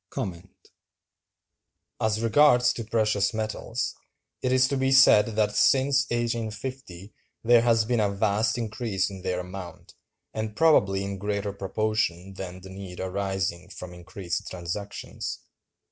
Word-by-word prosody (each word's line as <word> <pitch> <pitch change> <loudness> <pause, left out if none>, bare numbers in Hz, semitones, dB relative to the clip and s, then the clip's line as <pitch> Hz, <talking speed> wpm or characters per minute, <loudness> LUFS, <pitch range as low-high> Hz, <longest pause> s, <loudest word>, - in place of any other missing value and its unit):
As 110 +1 0
regards 125 +1 +5
the 115 - -5
precious 110 -2 +1
metals, 110 -1 -3 0.5
it 125 - 0
is 130 0 +4
to 140 - 0
be 135 0 +1
said 130 -5 +7
that 105 -1 +1
since 135 +4 +4
1850 115 -3 -4 0.3
there 120 0 +6
has 115 -2 +3
been 120 0 +1
a 105 -2 +2
vast 105 +3 +1
increase 110 -4 -2
in 95 -1 -9
their 90 0 -2
amount, 90 -2 -9 0.4
and 110 -1 -4
probably 100 -10 +4
in 100 -1 -5
greater 100 0 -2
proportion 100 -2 -2
than 95 -1 -7
the 95 +1 -11
need 95 -2 -9
arising 95 -2 -2
from 90 -3 -9
increased 90 0 -5
transactions. 90 +3 -5
105 Hz, 130 wpm, -26 LUFS, 95-115 Hz, 0.5 s, said